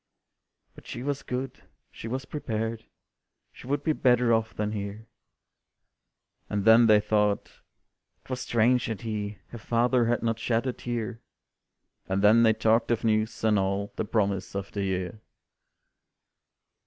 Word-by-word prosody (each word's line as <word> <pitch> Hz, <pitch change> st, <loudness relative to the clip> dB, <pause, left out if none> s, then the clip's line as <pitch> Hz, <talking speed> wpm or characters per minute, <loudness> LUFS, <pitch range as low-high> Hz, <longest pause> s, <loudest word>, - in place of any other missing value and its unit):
"But -, -, -16 dB
she 120 Hz, -, -6 dB
was 140 Hz, 0 st, -2 dB
good, 130 Hz, +1 st, -5 dB, 0.3 s
she -, -, -8 dB
was 130 Hz, +4 st, -4 dB
prepared, 115 Hz, -6 st, -4 dB, 0.7 s
She -, -, -13 dB
would 145 Hz, +1 st, -1 dB
be 155 Hz, -, +2 dB
better 125 Hz, -4 st, +3 dB
off 110 Hz, 0 st, +1 dB
than 105 Hz, 0 st, -2 dB
here," 105 Hz, +1 st, -5 dB, 1.4 s
And 100 Hz, -1 st, -2 dB
then 115 Hz, +1 st, +7 dB
they 105 Hz, -1 st, +6 dB
thought 105 Hz, -1 st, 0 dB, 0.6 s
"'twas 130 Hz, -1 st, -4 dB
strange 120 Hz, +1 st, +2 dB
that 110 Hz, -5 st, -4 dB
he, 105 Hz, -2 st, -4 dB
Her 120 Hz, -, -9 dB
father, 120 Hz, +2 st, +2 dB
had 120 Hz, 0 st, 0 dB
not 115 Hz, -1 st, 0 dB
shed 115 Hz, +1 st, 0 dB
a 130 Hz, -, -1 dB
tear," 120 Hz, -1 st, -4 dB, 0.9 s
And 95 Hz, +1 st, 0 dB
then 110 Hz, +3 st, +6 dB
they 110 Hz, -1 st, +5 dB
talked 110 Hz, +1 st, +2 dB
of 120 Hz, -1 st, 0 dB
news, 110 Hz, 0 st, 0 dB
and 110 Hz, -2 st, +3 dB
all 100 Hz, +1 st, -2 dB
The -, -, -1 dB
promise 100 Hz, -3 st, -1 dB
of 100 Hz, 0 st, -4 dB
the 100 Hz, -, -3 dB
year. 95 Hz, +2 st, -3 dB
110 Hz, 150 wpm, -27 LUFS, 105-120 Hz, 1.4 s, then